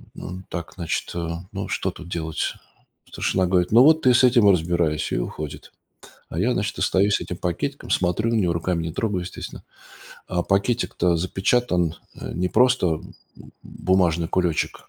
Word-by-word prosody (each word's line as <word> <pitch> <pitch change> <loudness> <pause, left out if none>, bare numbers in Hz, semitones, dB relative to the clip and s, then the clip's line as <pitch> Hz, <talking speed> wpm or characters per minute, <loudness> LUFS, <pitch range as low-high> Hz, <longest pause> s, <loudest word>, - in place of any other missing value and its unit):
м, 90 +1 -8
так, 85 0 -6
значит, 85 -4 -3
э, 85 -1 -2 0.2
ну, - - -4
что - - -1
тут 85 0 -11
делать? 80 -3 -2 0.6
Старшина 95 -1 0
говорит: 90 -1 +1
"Ну, 115 +3 +8
вот 160 +2 +6
ты 125 - +5
с 120 - +4
этим 120 -4 +5
и - - +8
разбирайся". 85 -3 0
И - - +1
уходит. 75 +4 -6 0.6
А 80 - -4
я, 120 +7 +2
значит, 105 0 -2
остаюсь 100 +2 +3
с - - -2
этим 90 - -5
пакетиком, 95 +12 -3
смотрю 95 +5 +1
на 115 - +1
него, 90 -6 +2
руками 85 0 -1
не 80 -1 -4
трогаю, 100 -1 -1
естественно. 90 - -8 0.7
А 90 -1 0
пакетик-то 100 -3 +1
запечатан, 90 -1 +1 0.2
а - - -7
не 90 +2 -1
просто, 125 +2 +3
м, - - -13 0.5
бумажный 85 -3 +1
кулечек, 90 -3 -1
90 Hz, 170 wpm, -23 LUFS, 85-105 Hz, 0.7 s, Ну